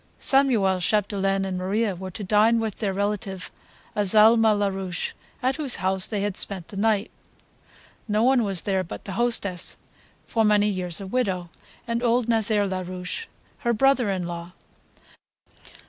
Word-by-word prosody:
Samuel 230 -9 +2
Chapdelaine 195 0 0
and 185 -1 -3
Maria 200 +3 0
were 190 +1 -7
to 205 - -7
dine 215 +4 +3
with 220 -3 -3
their 205 -3 -1
relative 195 -1 -3 0.4
Azalma 215 +3 +5
Larouche, 195 -3 -2 0.3
at 260 +2 +1
whose 285 -5 -1
house 190 0 0
they 210 -3 -2
had 205 -2 -2
spent 190 -4 0
the - - -10
night. 210 0 +1 1.0
No 215 +1 +1
one 255 -1 +4
was 195 -4 0
there 190 -2 0
but 170 - -9
the 195 - -5
hostess, 200 -5 0 0.5
for 225 - +1
many 210 -1 +4
years 180 -4 -3
a - - -6
widow, 190 -6 -2 0.4
and 235 0 -1
old 240 -1 +2
Nazaire 220 -2 +2
Larouche, 185 - -5 0.3
her 240 -4 0
brother 260 -1 +3
in 185 -2 -2
law. 170 0 -7
205 Hz, 150 wpm, -24 LUFS, 190-225 Hz, 1.0 s, Azalma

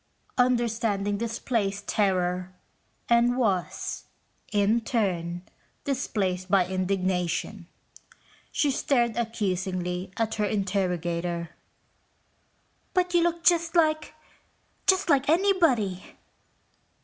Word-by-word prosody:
Understanding 225 -5 +1
displaced 220 -3 -2
terror 185 -2 0 0.5
and 240 +1 +3
was, 200 -8 -1 0.5
in 210 +3 +2
turn, 175 -7 -1 0.4
displaced 190 -9 -2
by 190 -1 +4
indignation. 185 0 -1 0.8
She 290 - +1
stared 240 -4 +1
accusingly 185 -5 -2
at 225 -1 0
her - - +3
interrogator. 175 -4 -1 1.4
"But 360 -1 +1
you 345 - +5
look 340 0 0
just 335 -1 +3
like... 310 -2 +2 0.7
just 380 0 +4
like 285 -3 +3
anybody." 320 - +2
205 Hz, 85 wpm, -26 LUFS, 185-250 Hz, 1.4 s, you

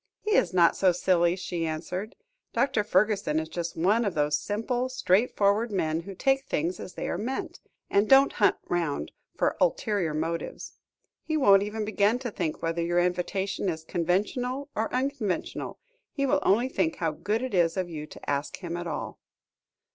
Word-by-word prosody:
"He 425 - -1
is 200 - +3
not 175 -2 +4
so 190 -2 +4
silly," 175 -1 +2
she 175 -2 -4
answered. 175 +6 -4 0.4
"Dr. 265 -6 +1
Fergusson 200 -5 +2
is 160 - -4
just 170 0 -5
one 205 +8 +3
of 200 -5 -2
those 150 0 +2
simple, 230 - -2
straightforward 215 -1 +2
men 160 -5 0
who 190 +3 -8
take 270 +6 +1
things 170 +4 -1
as 185 - -8
they - - -4
are 175 - -2
meant, 255 +5 -4 0.3
and 200 +1 +2
don't 270 +1 +6
hunt 205 - +5
round 170 -5 -1 0.2
for - - +1
ulterior 205 - +1
motives. 165 +2 -4 0.4
He 315 -1 -1
won't 200 -9 +6
even 210 +1 -3
begin 210 +2 +2
to 250 -2 -5
think 165 -6 -3
whether 165 +1 -1
your 175 +1 0
invitation 185 +2 -1
is 160 -2 -4
conventional 210 - -1
or 220 +1 -1
unconventional, 255 -6 -2 0.3
he 275 - -1
will 285 +2 +3
only 235 +6 +3
think 315 +3 0
how 165 - -1
good 210 +9 -2
it 260 - -4
is 175 -1 +2
of 185 -1 -1
you 155 -3 -6
to - - -13
ask 140 0 -2
him 170 -2 -5
at 175 0 -5
all." 155 - -5
190 Hz, 175 wpm, -27 LUFS, 170-230 Hz, 0.4 s, don't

